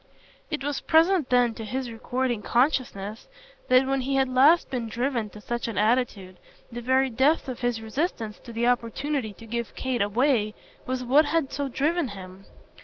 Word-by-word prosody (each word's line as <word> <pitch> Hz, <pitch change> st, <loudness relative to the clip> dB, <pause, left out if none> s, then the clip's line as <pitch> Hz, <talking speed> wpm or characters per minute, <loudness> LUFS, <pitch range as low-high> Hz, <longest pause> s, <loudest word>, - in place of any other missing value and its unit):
It 300 Hz, -3 st, -3 dB
was 290 Hz, 0 st, -2 dB
present 330 Hz, -1 st, +3 dB
then 245 Hz, -2 st, +3 dB
to 225 Hz, -, -7 dB
his 250 Hz, +2 st, -4 dB
recording 240 Hz, 0 st, -2 dB
consciousness 235 Hz, -4 st, 0 dB, 0.4 s
that 255 Hz, +1 st, +5 dB
when 270 Hz, 0 st, 0 dB
he 270 Hz, +2 st, -1 dB
had 270 Hz, 0 st, +3 dB
last 275 Hz, +7 st, +4 dB
been 240 Hz, -3 st, -3 dB
driven 235 Hz, -1 st, -1 dB
to 210 Hz, -, -12 dB
such 235 Hz, +2 st, -3 dB
an 225 Hz, -4 st, -5 dB
attitude 210 Hz, -4 st, 0 dB, 0.3 s
the 240 Hz, +1 st, -6 dB
very 260 Hz, +2 st, +2 dB
depth 275 Hz, +7 st, +2 dB
of 255 Hz, -2 st, -5 dB
his 240 Hz, -2 st, -1 dB
resistance 220 Hz, -, -3 dB
to 235 Hz, -, -11 dB
the 230 Hz, +1 st, -1 dB
opportunity 245 Hz, +1 st, -1 dB
to 225 Hz, -, -14 dB
give 235 Hz, 0 st, -4 dB
Kate 260 Hz, -3 st, -2 dB
away 215 Hz, +1 st, +1 dB, 0.3 s
was 255 Hz, 0 st, -2 dB
what 280 Hz, +5 st, +4 dB
had 305 Hz, -2 st, 0 dB
so 285 Hz, 0 st, -2 dB
driven 300 Hz, +5 st, 0 dB
him. 190 Hz, -2 st, -10 dB
250 Hz, 180 wpm, -26 LUFS, 225-270 Hz, 0.4 s, that